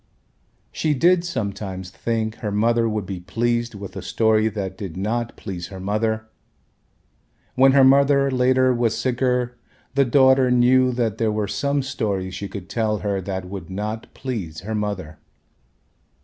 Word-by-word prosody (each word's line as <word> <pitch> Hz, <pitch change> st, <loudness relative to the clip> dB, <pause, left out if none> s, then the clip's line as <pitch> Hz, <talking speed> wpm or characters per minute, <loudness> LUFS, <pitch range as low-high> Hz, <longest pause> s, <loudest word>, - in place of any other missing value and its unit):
She 155 Hz, -2 st, 0 dB
did 175 Hz, +5 st, +4 dB
sometimes 100 Hz, -, -4 dB
think 110 Hz, +3 st, -2 dB
her 105 Hz, -, -4 dB
mother 115 Hz, +2 st, +2 dB
would 105 Hz, -2 st, -2 dB
be 95 Hz, -1 st, -5 dB
pleased 120 Hz, +5 st, -1 dB
with 100 Hz, -1 st, -8 dB
a -, -, -5 dB
story 110 Hz, -1 st, +2 dB
that 100 Hz, -3 st, -4 dB
did 95 Hz, -3 st, -7 dB
not 115 Hz, +4 st, -2 dB
please 90 Hz, -4 st, -6 dB
her 95 Hz, -, -9 dB
mother, 110 Hz, +3 st, -1 dB, 1.3 s
when 135 Hz, +1 st, +5 dB
her 135 Hz, -1 st, +6 dB
mother 140 Hz, +1 st, +5 dB
later 130 Hz, 0 st, +3 dB
was 120 Hz, -2 st, 0 dB
sicker 125 Hz, -1 st, 0 dB, 0.3 s
the 140 Hz, 0 st, +4 dB
daughter 130 Hz, 0 st, +4 dB
knew 125 Hz, +1 st, +4 dB
that 115 Hz, -3 st, -1 dB
there 110 Hz, -2 st, +2 dB
were 105 Hz, -1 st, -1 dB
some 140 Hz, +6 st, -1 dB
stories 100 Hz, -9 st, -2 dB
she 100 Hz, +2 st, -5 dB
could 100 Hz, -2 st, -8 dB
tell 110 Hz, -2 st, 0 dB
her 100 Hz, -2 st, 0 dB
that 95 Hz, 0 st, -4 dB
would 90 Hz, -2 st, -8 dB
not 105 Hz, +4 st, -5 dB
please 95 Hz, -, -5 dB
her 110 Hz, +4 st, -5 dB
mother. 100 Hz, -7 st, -3 dB
110 Hz, 155 wpm, -22 LUFS, 100-125 Hz, 1.3 s, her